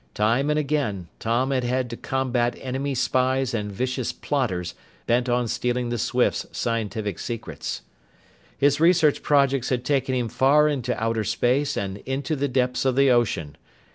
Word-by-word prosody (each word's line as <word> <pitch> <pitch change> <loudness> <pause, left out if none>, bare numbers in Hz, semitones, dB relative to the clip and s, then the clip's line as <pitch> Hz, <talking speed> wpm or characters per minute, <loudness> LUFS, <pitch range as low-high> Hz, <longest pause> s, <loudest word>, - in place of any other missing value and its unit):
Time 115 +7 +2
and 150 - +2
again, 140 - -1
Tom 120 +4 0
had 130 -2 +1
had 125 +1 0
to - - -4
combat 125 -2 -1
enemy 135 +2 -3
spies 130 0 +1
and 105 -2 -2
vicious 130 +4 -2
plotters 95 - -2 0.3
bent 120 +1 +1
on 120 0 +1
stealing 125 +1 -1
the 120 -1 -2
Swifts' 125 +2 +1
scientific 110 -4 -2
secrets. 115 - -5 0.7
His 145 +1 +3
research 165 -3 +4
projects 140 -3 +2
had 125 -1 -1
taken 135 -2 +1
him 125 -2 0
far 145 +6 +4
into 130 -4 -1
outer 115 0 0
space 125 +7 +1
and 95 -1 -3
into 135 +7 -3
the 145 0 0
depths 125 -1 0
of 130 -2 +1
the 140 -1 +5
ocean. 100 -11 0
125 Hz, 160 wpm, -24 LUFS, 115-135 Hz, 0.7 s, the